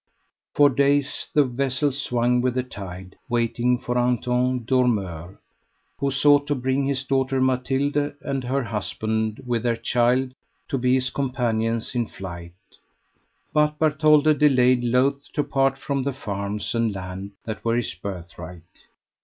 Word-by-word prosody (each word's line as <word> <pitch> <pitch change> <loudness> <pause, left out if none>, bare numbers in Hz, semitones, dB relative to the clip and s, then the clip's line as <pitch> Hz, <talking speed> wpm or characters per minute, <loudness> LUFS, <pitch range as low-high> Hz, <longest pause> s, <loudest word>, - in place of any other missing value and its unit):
For 145 -1 +6
days 140 +1 +1
the 150 - +6
vessel 135 +2 0
swung 125 -2 0
with 125 0 0
the 130 - 0
tide, 95 -6 -9
waiting 120 +1 +1
for 125 0 -2
Anton 125 0 0
Dormeur, 100 - 0 0.6
who 140 -1 +1
sought 145 +1 +4
to 145 - +1
bring 130 +1 0
his 140 -1 -1
daughter 135 0 0
Mathilde 135 +3 0
and 135 -2 -2
her 130 +2 -1
husband, 110 +2 -2
with 120 -2 0
their 120 0 +1
child, 125 +2 +1 0.4
to 135 - -1
be 125 +1 +3
his 130 -1 0
companions 115 -4 -1
in 120 -3 0
flight. 85 -2 -8 1.0
But 150 0 +2
Bartholde 155 -1 +4
delayed, 130 -4 +4
loath 130 +4 +1
to 145 - +1
part 135 -1 +1
from 140 0 -2
the 140 +1 -2
farms 100 -3 -4
and 115 -1 +1
land 95 +1 -7
that 110 -1 -5
were 115 0 +1
his 120 -1 -1
birthright. 85 -2 -8
125 Hz, 145 wpm, -24 LUFS, 115-135 Hz, 1.0 s, For